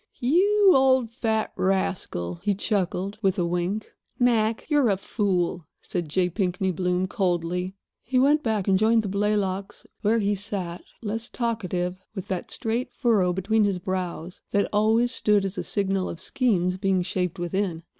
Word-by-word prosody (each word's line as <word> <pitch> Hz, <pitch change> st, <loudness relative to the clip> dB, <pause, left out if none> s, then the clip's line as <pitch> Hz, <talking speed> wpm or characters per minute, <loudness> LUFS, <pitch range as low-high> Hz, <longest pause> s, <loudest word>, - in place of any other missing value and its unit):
"You 385 Hz, +9 st, +4 dB
old 260 Hz, -3 st, +4 dB
fat 220 Hz, -2 st, -1 dB
rascal!" 185 Hz, -, -1 dB
he 200 Hz, 0 st, +1 dB
chuckled, 195 Hz, 0 st, -1 dB
with 195 Hz, -1 st, +1 dB
a 175 Hz, -, +1 dB
wink. 180 Hz, +5 st, -2 dB, 0.3 s
"Mac, 230 Hz, -3 st, +2 dB
you're 290 Hz, -6 st, +3 dB
a 195 Hz, -, +2 dB
fool," 185 Hz, -5 st, -1 dB
said 175 Hz, -4 st, -4 dB
J. 180 Hz, +4 st, +2 dB
Pinkney 185 Hz, 0 st, -1 dB
Bloom, 180 Hz, +1 st, 0 dB
coldly. 180 Hz, -2 st, -1 dB, 0.3 s
He 255 Hz, +2 st, -1 dB
went 290 Hz, +4 st, +4 dB
back 215 Hz, -6 st, -1 dB
and 190 Hz, -1 st, +4 dB
joined 225 Hz, +1 st, +4 dB
the -, -, -3 dB
Blaylocks, 200 Hz, -1 st, -1 dB, 0.2 s
where 220 Hz, +2 st, +3 dB
he 205 Hz, -2 st, +1 dB
sat, 195 Hz, -3 st, -5 dB, 0.2 s
less 225 Hz, +2 st, -3 dB
talkative, 185 Hz, -7 st, -2 dB, 0.2 s
with 190 Hz, -, -6 dB
that 185 Hz, -2 st, -3 dB
straight 230 Hz, +3 st, -2 dB
furrow 215 Hz, -8 st, +2 dB
between 205 Hz, +4 st, +1 dB
his 200 Hz, -2 st, +1 dB
brows 180 Hz, -1 st, -4 dB
that 200 Hz, 0 st, +1 dB
always 220 Hz, +3 st, +3 dB
stood 210 Hz, -5 st, +2 dB
as 195 Hz, +1 st, -4 dB
a -, -, -2 dB
signal 195 Hz, -2 st, -1 dB
of 165 Hz, -, -7 dB
schemes 185 Hz, -9 st, 0 dB
being 190 Hz, -1 st, +1 dB
shaped 180 Hz, 0 st, -2 dB
within. 175 Hz, -1 st, -2 dB
195 Hz, 160 wpm, -25 LUFS, 180-220 Hz, 0.3 s, You